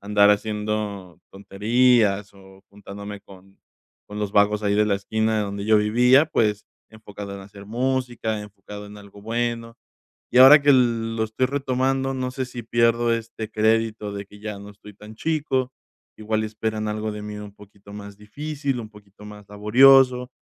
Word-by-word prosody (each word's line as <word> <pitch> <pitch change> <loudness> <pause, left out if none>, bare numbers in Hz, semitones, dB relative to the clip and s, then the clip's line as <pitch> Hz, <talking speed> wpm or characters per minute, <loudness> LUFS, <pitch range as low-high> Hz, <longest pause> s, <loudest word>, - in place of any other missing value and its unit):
andar 100 0 +3
haciendo 105 -4 -3
tonterías 105 +1 +1
o 95 0 -18
juntándome 100 0 -10
con 95 0 -18 0.5
con 105 0 -8
los 105 -1 -3
vagos 105 +1 +2
ahí 100 0 +1
de 105 +1 +3
la 100 -2 +1
esquina 110 +2 -1
donde 100 0 -4
yo 110 0 +4
vivía, 125 +7 +4
pues, 105 -8 -1 0.2
enfocado 105 -2 -10
en 100 - -9
hacer 100 +1 -13
música, 120 -2 -2
enfocado 105 0 -11
en 105 0 -12
algo 100 0 -15
bueno, 115 +1 -3 0.5
y 125 - +4
ahora 140 +3 +9
que 145 - +5
lo 115 -3 +1
estoy 110 +4 -2
retomando, 135 0 -1
no 130 -1 -3
sé 130 0 -4
si 120 -1 -8
pierdo 115 +1 +1
este 115 -1 -6
crédito 110 -1 0
de 100 0 -6
que 105 0 -16
ya 105 -2 -6
no 100 +1 -11
estoy 105 0 -15
tan 105 +2 -13
chico, 140 -4 -1 0.4
igual 110 0 -2
esperan 110 0 -4
algo 105 +1 -3
de 105 - -7
mí 105 0 -7
un 105 -1 -10
poquito 100 0 -17
más 100 -1 -10
difícil, 140 +4 -4
un 110 -1 -10
poquito 105 -1 -17
más 105 -1 -12
laborioso, 125 +4 +4
105 Hz, 165 wpm, -23 LUFS, 105-120 Hz, 0.5 s, ahora